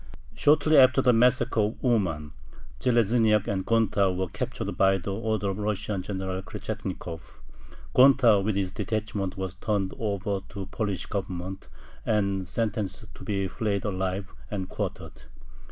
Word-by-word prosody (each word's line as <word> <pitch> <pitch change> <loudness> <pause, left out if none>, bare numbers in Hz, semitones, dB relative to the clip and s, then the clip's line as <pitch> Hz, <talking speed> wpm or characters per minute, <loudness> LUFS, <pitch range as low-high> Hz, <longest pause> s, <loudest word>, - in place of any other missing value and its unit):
Shortly 155 +1 +4
after 130 0 +6
the 125 - +5
massacre 125 0 +3
of 105 +2 0
Uman, 90 - +1 0.5
Zheleznyak 115 -3 +3
and 95 -2 -1
Gonta 105 -4 +2
were 90 0 -2
captured - - -4
by 95 0 +4
order 95 +2 -5
of 110 +2 -1
the 100 -1 0
Russian 105 -1 -2
General 95 -1 -4
Krechetnikov. 95 -5 -6 0.7
Gonta 125 -6 +6
with 105 0 0
his 95 -2 -1
detachment 105 -2 -3
was 95 -2 -3
turned 100 -3 -1
over 100 -2 -1
to 100 0 -7
the - - -4
Polish 100 -5 -2
Government, 95 -1 -5 0.4
and 100 -3 0
sentenced 110 0 -3
to - - -12
be 100 -2 -1
flayed 100 -1 -2
alive 95 -1 -2 0.2
and 95 -3 -3
quartered. - - -6
100 Hz, 140 wpm, -27 LUFS, 95-110 Hz, 0.7 s, after